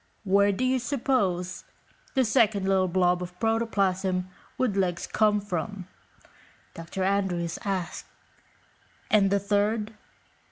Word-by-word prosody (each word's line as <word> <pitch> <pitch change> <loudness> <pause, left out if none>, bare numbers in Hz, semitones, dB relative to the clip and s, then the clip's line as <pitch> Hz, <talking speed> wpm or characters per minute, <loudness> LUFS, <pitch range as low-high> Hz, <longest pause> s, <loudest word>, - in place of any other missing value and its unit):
"Where 200 0 +4
do 200 +6 -2
you 255 0 +2
suppose 230 -9 -1 0.5
the 260 -1 +3
second 215 -4 +2
little 190 -1 +3
blob 180 0 +2
of 180 0 -8
protoplasm 195 -5 0 0.3
with 245 -6 0
legs 180 -3 0
came 210 -1 +2
from?" 195 -1 -4 0.9
Dr. 170 +3 -5
Andrews 185 -4 0
asked. 190 -3 -3 1.0
"And 200 -2 +5
the 200 +1 +2
third? 210 +2 0
195 Hz, 115 wpm, -27 LUFS, 180-215 Hz, 1.0 s, And